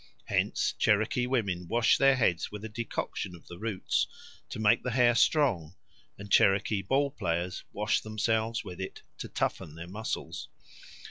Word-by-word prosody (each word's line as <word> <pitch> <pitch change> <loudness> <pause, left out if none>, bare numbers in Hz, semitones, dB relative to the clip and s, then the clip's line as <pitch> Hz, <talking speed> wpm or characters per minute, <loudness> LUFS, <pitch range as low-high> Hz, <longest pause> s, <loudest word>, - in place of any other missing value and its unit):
Hence - - 0
Cherokee 110 +4 +2
women 100 -9 -1
wash 115 +4 +3
their 135 0 +6
heads 90 -9 +1
with 105 +1 -7
a - - -5
decoction 110 -5 -4
of 85 - -16
the 85 - -10
roots 110 -3 0 0.4
to - - -6
make 110 +1 +4
the 125 - -3
hair 120 -1 +4
strong, 115 - +2 0.4
and 105 0 -10
Cherokee 100 +1 +4
ball 140 +8 +1
players 90 -4 -2
wash 105 +2 0
themselves 110 +1 -1
with 90 0 -8
it 95 - -7 0.2
to - - -5
toughen 75 - -2
their 85 +1 -7
muscles. 105 +5 -5
105 Hz, 155 wpm, -29 LUFS, 90-115 Hz, 0.4 s, their